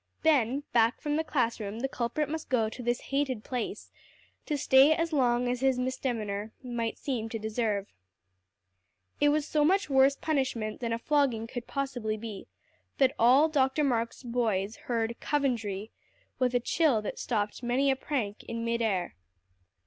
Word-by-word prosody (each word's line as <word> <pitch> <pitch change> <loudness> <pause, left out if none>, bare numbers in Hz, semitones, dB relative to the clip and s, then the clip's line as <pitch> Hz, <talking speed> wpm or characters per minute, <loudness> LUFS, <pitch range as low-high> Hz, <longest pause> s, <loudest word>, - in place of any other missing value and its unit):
Then 280 -3 +3
back 230 0 +3
from 295 -1 -1
the 320 - +1
class 250 -8 0
room 215 +2 -5
the 270 - 0
culprit 270 +4 -2
must 320 +2 -5
go 230 -4 +2
to 235 - -8
this 240 0 0
hated 270 -6 0
place, 250 -3 -4 0.6
to 300 - 0
stay 270 +2 +6
as 330 0 -1
long 245 -3 +2
as 245 0 -1
his 265 -1 +2
misdemeanor 230 -5 -2
might 235 -2 -3
seem 235 -5 -3
to 225 - -3
deserve. 215 -2 -1 1.3
It 290 - +5
was 295 0 +1
so 300 -1 +2
much 375 0 +2
worse 270 +1 +5
punishment 260 -9 -1
than 235 -2 -3
a 230 - 0
flogging 260 -3 +1
could 245 +1 -7
possibly 245 -6 -2
be, 215 -2 -7 0.5
that 265 -1 +4
all 260 +7 +6
Dr. 280 -1 +1
Marks' 235 -2 -1
boys 225 -4 -1
heard 235 -1 -1
"Coventry" 225 -8 -1 0.5
with 250 -1 +1
a - - +4
chill 250 -3 +2
that - - -5
stopped 210 -2 -2
many 255 +3 +2
a - - +1
prank 245 -7 -3
in 230 0 -4
mid 235 0 0
air. 195 -6 0
245 Hz, 165 wpm, -29 LUFS, 225-275 Hz, 1.3 s, stay